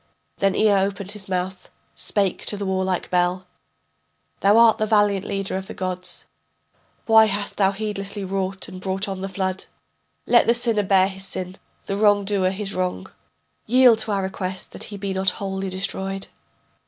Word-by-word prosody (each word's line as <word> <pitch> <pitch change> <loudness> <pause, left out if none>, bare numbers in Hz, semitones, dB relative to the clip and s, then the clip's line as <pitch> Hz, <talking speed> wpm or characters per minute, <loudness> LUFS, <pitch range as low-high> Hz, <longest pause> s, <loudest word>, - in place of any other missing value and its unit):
Then 195 -1 +1
Ea 215 -1 +4
opened 195 0 -3
his 200 -2 -8
mouth, 185 0 -3 0.2
Spake 195 -3 -1
to 205 - 0
the 200 - -4
warlike 190 -1 -1
Bel: 180 +1 +1 0.9
Thou 200 +2 +4
art 230 -1 +6
the 215 - +1
valiant 205 -3 +2
leader 195 -1 -3
of 190 0 -6
the - - -8
gods, 180 -1 -4 0.8
Why 220 -1 +7
hast 205 -1 -2
thou 195 -1 +3
heedlessly 200 -1 -4
wrought, 190 0 -3
and 185 - -9
brought 190 +2 0
on 190 -1 -5
the 195 - -4
flood? 190 0 -3 0.6
Let 240 - +4
the 235 - +4
sinner 230 -3 +1
bear 190 -1 +4
his 190 0 -3
sin, 185 +1 -2 0.3
the 195 - -2
wrongdoer 205 -2 +3
his 195 +1 -4
wrong; 180 - -3 0.6
Yield 245 -1 +6
to 220 - -3
our 195 -1 0
request, 190 -1 -4
that - - -8
he 205 - -8
be 195 -1 -3
not 190 0 +2
wholly 195 -1 -3
destroyed. 195 +1 -2
195 Hz, 170 wpm, -23 LUFS, 190-205 Hz, 0.9 s, Why